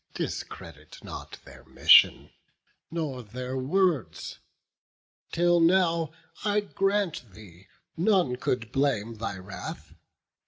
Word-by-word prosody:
Discredit 75 -2 -7
not - - -8
their - - -14
mission, - - +5 0.6
nor 155 -6 -3
their 125 +4 -6
words. 155 - 0 0.9
Till 175 0 +3
now, 165 -2 +3 0.3
I 210 0 +2
grant 195 - -1
thee, 95 -3 -15 0.3
none 175 -7 +2
could 120 -2 -2
blame 115 -5 0
thy 110 -3 -4
wrath. 95 +1 -8
140 Hz, 95 wpm, -27 LUFS, 110-175 Hz, 0.9 s, mission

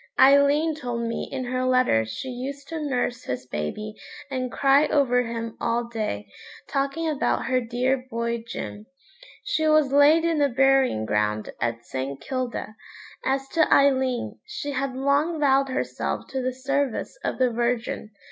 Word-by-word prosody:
Aileen 280 +4 +5
told 245 -5 -4
me 230 - -3
in 265 -1 -3
her 255 +1 -2
letter 255 - +3
she 110 - -5
used 275 +3 -6
to 325 -1 -4
nurse 250 -3 -1
his 125 0 -4
baby 125 - -4 0.4
and 255 -2 -2
cry 275 +4 +4
over 250 -4 +3
him 230 -1 -4
all 235 +1 +1
day, 215 - -4 0.4
talking 280 +4 -1
about 300 -3 0
her 255 -1 +1
dear 250 +2 -1
boy 235 -1 -2
Jim. 210 -2 -6 0.6
She 315 0 0
was 305 -3 +4
laid 295 +4 +6
in 330 -2 +1
the 285 -1 +3
burying 265 - +3
ground 105 0 0
at 115 0 -2
St. 135 +1 -4
Kilda. 255 -4 -4 0.5
As 270 0 0
to 320 -2 +2
Aileen, 265 -3 +2
she 425 -9 -5
had 270 -1 -2
long 285 +5 +1
vowed 275 -1 +3
herself 260 - -2
to 265 - -2
the 255 0 -1
service 275 - -1
of - - -2
the 255 -2 +2
Virgin. 235 -2 -1
255 Hz, 155 wpm, -25 LUFS, 235-280 Hz, 0.6 s, laid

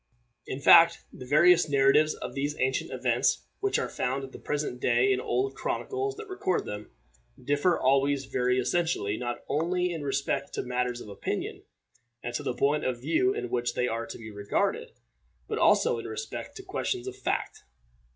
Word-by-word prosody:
In 130 - -4
fact, 165 +3 +7
the 125 - -10
various 170 +3 +5
narratives 140 +2 +4
of 125 0 -7
these 145 +2 -2
ancient 130 0 0
events, - - +1
which 400 0 +1
are - - -1
found 135 +2 -2
at 135 - -8
the - - -10
present 145 -4 -3
day 125 +2 +3
in 130 - +2
the - - -6
old 130 +2 0
chronicles 405 - -3
that 435 -1 -9
record 375 - -1
them, 105 +1 -6 0.5
differ 145 +7 +1
always 135 +1 +2
very 125 0 0
essentially, 130 -6 0
not 120 +1 -4
only 180 +3 0
in 160 - -5
respect 140 0 -2
to - - -2
matters 125 -1 -2
of - - -10
opinion, 100 - -4 0.6
and 120 - -4
to - - -2
the 125 - -3
point 145 +4 +1
of 125 -2 -1
view 250 - +2
in 440 - -4
which 120 -1 -1
they 125 - +1
are 115 0 -3
to - - -8
be 110 -1 -9
regarded, 200 - -1 0.5
but - - -2
also - - +4
in - - -7
respect 445 - -6
to 390 - -9
questions 375 -1 -3
of 390 - -5
fact. 400 - -3
140 Hz, 185 wpm, -28 LUFS, 125-175 Hz, 0.6 s, fact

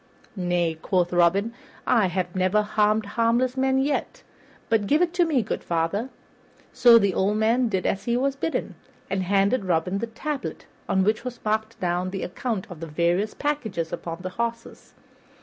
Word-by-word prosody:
"Nay," 175 -3 0
quoth 180 -2 0
Robin, 185 +6 +3 0.3
"I 230 -6 +3
have 180 0 -3
never 185 +3 +2
harmed 210 +1 +1
harmless 235 +4 +1
man 265 0 +2
yet; 275 +2 -1 0.4
but 220 -3 +1
give 300 - +3
it 350 -1 +1
to 355 -1 +3
me, 285 -8 +1
good 210 - -4
father." 170 +8 -1 0.6
So 240 -2 +7
the 200 -4 +2
old 200 +4 +1
man 230 +3 +2
did 190 -3 -1
as 195 - -1
he 235 0 +1
was 275 +2 0
bidden, 320 +4 -2 0.4
and 195 -1 0
handed 200 +4 +2
Robin 180 +2 0
the 230 - -3
tablet 275 +5 -5 0.2
on 190 - +3
which 215 +2 +1
was 250 -2 -6
marked 220 +1 -1
down 180 +1 -1
the 195 0 -4
account 215 +1 -3
of 170 - -9
the 165 - -6
various 175 +6 0
packages 220 - -2
upon 170 +1 -5
the 185 - -3
horses. 230 +4 -5
210 Hz, 175 wpm, -25 LUFS, 180-235 Hz, 0.6 s, So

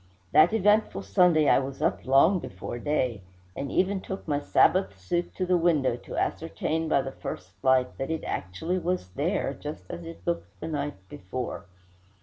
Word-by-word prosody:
That 155 +9 +6
eventful 210 - +2
Sunday 155 - +4
I - - +6
was 135 0 -5
up - - -1
long 150 +8 +5
before 95 - -6
day, 125 -6 0 0.3
and 140 0 -4
even 190 +1 +1
took 190 -1 -7
my 145 -2 +1
Sabbath 145 - +3
suit 170 - -2
to 185 - -1
the 180 0 +3
window 150 -8 +2
to 120 - -8
ascertain 160 0 -1
by 140 - +3
the 135 - -5
first 90 -7 -7
light 130 -1 +2
that 135 - -2
it 160 -1 -2
actually 160 - -2
was 180 - -2
there, - - -1
just 90 - -7
as 85 - -6
it 85 +2 -10
looked 85 +3 -3
the - - -5
night 145 -1 -2
before. 95 +2 -6
140 Hz, 175 wpm, -27 LUFS, -, 0.3 s, That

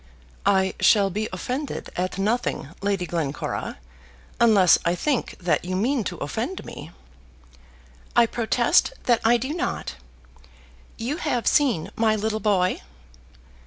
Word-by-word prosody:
"I 190 -1 +3
shall 200 -3 +4
be 215 +4 -2
offended 255 +10 -4
at 185 +1 -2
nothing, 210 - -1
Lady 195 -2 0
Glencora, 160 -5 -3 0.6
unless 210 -6 +6
I 170 +1 +1
think 275 +5 -1
that 175 -2 0
you 185 +1 -3
mean 240 +5 +1
to 175 - -4
offend 230 - -4
me." 145 - -9 1.3
"I 235 - +6
protest 230 - +2
that 240 -2 +2
I 235 +2 +5
do 260 +5 -3
not. 320 - -3 1.0
You 255 +7 -3
have 250 -9 -1
seen 215 - +2
my 220 -1 +2
little 215 +1 -1
boy." 195 -4 +1
215 Hz, 125 wpm, -24 LUFS, 185-240 Hz, 1.3 s, unless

